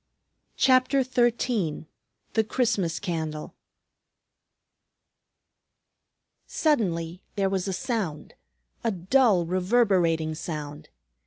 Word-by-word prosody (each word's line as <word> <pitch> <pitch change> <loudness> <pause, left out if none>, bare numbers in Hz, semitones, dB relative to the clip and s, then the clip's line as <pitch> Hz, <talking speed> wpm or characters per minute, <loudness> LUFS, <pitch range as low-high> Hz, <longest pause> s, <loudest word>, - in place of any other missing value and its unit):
CHAPTER 260 +1 +4
XIII 240 - 0 0.5
THE 220 - +3
CHRISTMAS 205 -8 0
CANDLE 160 -5 -4 2.9
Suddenly 180 - 0
there 195 -1 +1
was 190 0 -1
a - - -1
sound, 185 - -3 0.5
a 230 - +1
dull 195 0 +3
reverberating 180 -4 +2
sound. 150 -2 -6
190 Hz, 75 wpm, -26 LUFS, 165-240 Hz, 2.9 s, CHAPTER